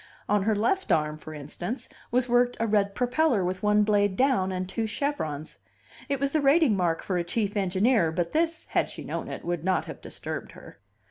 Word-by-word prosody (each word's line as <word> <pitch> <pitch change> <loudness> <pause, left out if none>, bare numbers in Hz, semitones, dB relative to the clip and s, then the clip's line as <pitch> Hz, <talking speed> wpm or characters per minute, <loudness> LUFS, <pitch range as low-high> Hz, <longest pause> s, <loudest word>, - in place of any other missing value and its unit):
On 210 -1 +2
her 215 +2 +1
left 380 - 0
arm, 150 -1 +1
for 155 - -9
instance, 155 - -6 0.2
was 250 +1 +1
worked 245 0 +3
a 230 - +1
red 205 -2 +1
propeller 250 - +2
with 185 +1 -2
one 210 0 +4
blade 205 -2 +2
down, 255 -9 +2
and 185 0 -3
two 220 +4 -2
chevrons. 185 - -3 0.5
It 280 -1 0
was 280 0 0
the 310 - +1
rating 280 -4 +4
mark 175 -3 0
for 185 -2 -1
a - - 0
chief 205 +4 -2
engineer, 195 -1 +2
but 170 0 -1
this, 325 +1 0
had - - +1
she - - -8
known - - -4
it, - - -7
would 175 -2 -2
not 185 +1 +1
have - - -9
disturbed - - -6
her. 95 - -14
210 Hz, 205 wpm, -27 LUFS, 180-250 Hz, 0.5 s, one